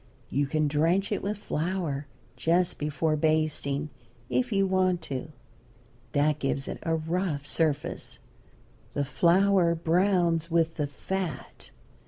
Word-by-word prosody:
You 140 0 +1
can 155 +1 +1
drench 165 +8 +2
it 205 - 0
with 205 +2 -2
flour, 160 -6 -2 0.3
just 175 +2 +1
before 150 +1 0
basting, 155 -2 0 0.4
if 250 -1 +1
you 195 -1 +3
want 185 -2 +1
to. 135 +3 -4 0.8
That 150 +1 +2
gives 135 0 -1
it - - -5
a 165 -1 0
rough 160 -2 -1
surface. 150 -1 -1 0.8
The 145 - +1
flour 175 +3 +4
browns 170 0 +2
with 165 -1 +1
the 150 -2 0
fat. 185 +4 -5
165 Hz, 125 wpm, -28 LUFS, 150-185 Hz, 0.8 s, flour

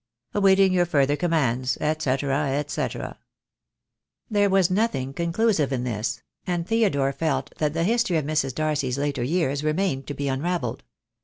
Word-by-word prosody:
"Awaiting 195 -1 +4
your 175 -1 +2
further 145 -3 +2
commands, 135 -7 +1
&c, 150 - 0
&c." 140 0 -1 1.3
There 205 -1 +3
was 190 -2 +3
nothing 185 - 0
conclusive 170 -1 +1
in 125 -2 -1
this; 115 0 -3 0.2
and 175 -2 -1
Theodore 150 -12 +2
felt 140 -2 -2
that 150 -1 +1
the 165 - +1
history 225 -3 +2
of 155 - -1
Mrs. 145 -4 0
Darcy's 150 -4 -1
later 140 -2 -1
years 145 +1 0
remained 155 -3 0
to 145 - -4
be 140 - -3
unravelled. 135 -2 -2
150 Hz, 145 wpm, -24 LUFS, 135-180 Hz, 1.3 s, Awaiting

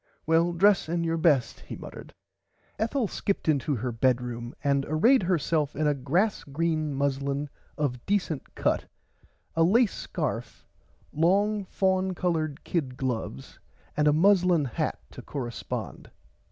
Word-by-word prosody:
Well 165 +2 +3
dress 195 0 +4
in 170 0 0
your 165 0 0
best 150 -7 +2
he - - -8
muttered. - - -10 0.7
Ethel 230 +2 0
skipped 200 -1 -2
into 145 -1 +2
her 125 +2 -2
bedroom 120 0 -1
and 140 -1 +2
arrayd 225 - +4
herself 165 -4 0
in 155 - 0
a 150 - +3
grass 165 - 0
green 155 0 -1
muslin 140 +1 -1 0.3
of 125 -5 -2
decent 180 -8 -1
cut - - 0 0.7
a 165 - +2
lace 210 +6 +4
scarf - - -4 0.5
long 200 +6 +2
faun 190 0 0
colored 160 -5 -1
kid 135 -7 -2
gloves 115 - -4 0.4
and 150 0 +2
a - - +6
muslin 180 -1 +4
hat 120 - -2
to - - -9
correspond. 120 -5 -5
155 Hz, 135 wpm, -27 LUFS, 140-185 Hz, 0.7 s, a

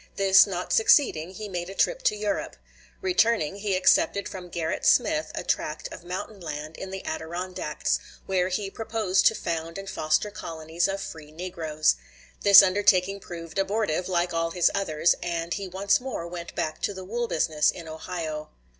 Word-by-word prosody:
This 195 +1 +6
not 180 -2 -3
succeeding, 220 - +4
he 215 +2 -6
made 175 -2 -4
a 195 - -8
trip - - +1
to - - +3
Europe. 210 -1 -2 0.5
Returning, 230 - +2
he 200 -1 -1
accepted 190 +1 +3
from 180 -2 -8
Gerrit 165 -2 -3
Smith 155 0 +3
a - - -3
tract 155 0 -2
of - - -10
mountain 185 +4 -6
land 155 -1 -6
in 190 - -7
the 190 0 -7
Adirondacks, 170 0 -3 0.3
where 185 -1 +1
he 195 +1 -2
proposed 215 -4 +1
to 220 - +3
found 165 -2 -3
and 195 0 -7
foster 155 +5 0
colonies 165 -2 -2
of 195 0 -3
free 155 -5 -8
negroes. 160 -2 0 0.4
This 200 -1 +10
undertaking 195 0 +3
proved 170 -1 -7
abortive, 195 -3 0
like 175 -1 0
all 165 0 0
his 175 0 +2
others, 170 -4 +2
and 170 -1 -2
he 200 -2 -4
once 195 +2 +1
more 250 -10 -4
went 170 0 -8
back 155 - -3
to 205 - -1
the 185 0 -7
wool 235 +4 -2
business 155 -4 +2
in 170 -2 -5
Ohio. 155 -1 -5
180 Hz, 170 wpm, -26 LUFS, 165-200 Hz, 0.5 s, This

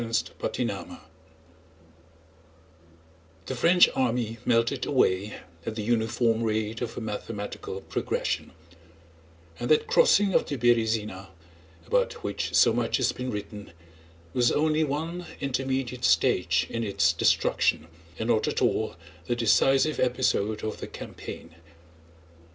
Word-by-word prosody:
CHAPTER 115 -1 -2
X - - -4 2.6
The 130 - -4
French 175 +8 +6
army 120 -3 -1
melted 115 -1 +1
away 100 -6 +1 0.3
at 110 - -5
the 110 - -3
uniform 115 0 +1
rate 110 +1 -1
of 115 -2 -4
a - - -3
mathematical 105 -2 -5
progression; - - -2 1.1
and 120 - -3
that 155 - +4
crossing 200 -1 +4
of - - +2
the 145 - -3
Berëzina 110 -5 +1 0.6
about - - +1
which - - -3
so 115 - +6
much 115 -1 0
has 125 -2 +1
been 125 +1 -5
written 105 -3 -7 0.6
was 120 -1 +3
only 155 +1 +2
one 160 +5 -3
intermediate 130 -2 -2
stage 85 -5 +3
in 115 0 -2
its 100 -3 +2
destruction, 80 -1 +2 0.3
and 110 - -3
not 110 -2 +2
at - - -1
all - - 0 0.3
the 120 - 0
decisive 135 +5 +3
episode 110 -4 0
of 110 - -4
the - - -6
campaign. - - -9
115 Hz, 120 wpm, -27 LUFS, 110-130 Hz, 2.6 s, French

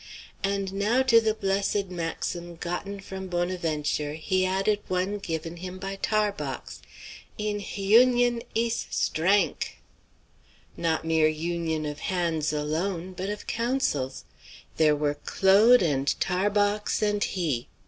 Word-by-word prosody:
And 195 -1 -1
now 215 +6 +2
to 230 -3 +6
the 220 -1 +1
blessed 200 -1 0
maxim 170 0 -4
gotten 180 +4 -4
from 190 0 -7
Bonaventure 165 -5 -1
he 185 +4 0
added 195 +3 +1
one 185 +3 -1
given 165 -2 -4
him 180 +1 -7
by 195 +1 -5
Tarbox: 210 0 -2 0.6
"In 210 -1 -1
h 200 - -7
union 240 +4 +4
ees 230 +1 0
strank!" 190 +6 +1 1.0
Not 165 -1 -1
mere 160 -1 +3
union 160 0 -2
of 150 -1 -5
hands 170 -4 -1
alone; 165 +5 -2
but 185 +2 -4
of 210 0 -5
counsels! 230 - -1 0.5
There 155 -2 +4
were 145 0 -1
Claude 205 +5 +5
and 140 -4 0
Tarbox 205 +3 +1
and 205 -1 +1
he! 155 -10 -1
185 Hz, 125 wpm, -27 LUFS, 165-205 Hz, 1.0 s, to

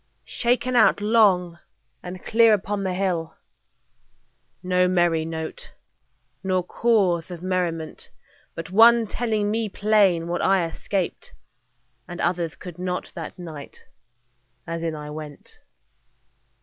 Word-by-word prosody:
Shaken 245 +1 0
out 225 -3 +5
long 200 -6 +3 0.4
and 180 +1 -9
clear 225 -1 +5
upon 205 0 -3
the 185 -1 -2
hill 175 -4 -2 1.3
No 180 0 +2
merry 175 -3 +2
note, 160 -1 -6 0.7
nor 185 -1 0
cause 190 -5 +1
of 175 -1 -8
merriment, 175 -4 -3 0.5
But 165 +2 -7
one 230 +3 +6
telling 215 -2 -1
me 220 0 -1
plain 200 -5 +2
what 175 +1 -2
I 190 -3 +3
escaped 180 +2 -4 0.7
And 175 -1 -8
others 170 -2 -1
could 180 -2 -10
not, 180 0 -3
that 165 +1 -7
night, 160 -5 -10 0.8
as 165 0 -4
in 165 -1 -2
I 150 0 -7
went. 150 -1 -10
180 Hz, 120 wpm, -24 LUFS, 165-205 Hz, 1.3 s, one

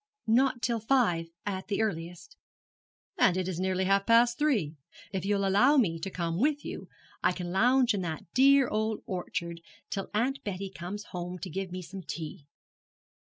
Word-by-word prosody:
'Not 245 +2 +2
till 235 -1 +1
five, 215 -9 +2 0.2
at 190 -2 -3
the 200 - -1
earliest.' 175 - -5 0.8
'And 185 - +4
it 185 -1 -1
is 180 -2 -3
nearly 190 0 0
half 195 +1 +2
past 235 +1 +5
three. 220 - +1 0.4
If 190 -2 -3
you'll 200 -1 +1
allow 205 +10 +5
me 170 -10 +2
to 175 - -4
come 170 -2 -2
with 290 +3 +1
you - - -7 0.3
I - - +3
can 180 -1 -5
lounge 245 +5 +4
in 200 - -1
that 160 -3 -4
dear 275 0 +6
old 220 0 -1
orchard 170 -2 -4 0.3
till 195 - -3
Aunt 250 +6 0
Betsy 195 -1 -4
comes 190 +4 -6
home 180 0 -4
to 180 0 -7
give 190 +1 -4
me 185 0 -5
some 190 +3 -8
tea.' 155 -4 -7
195 Hz, 175 wpm, -29 LUFS, 180-230 Hz, 0.8 s, dear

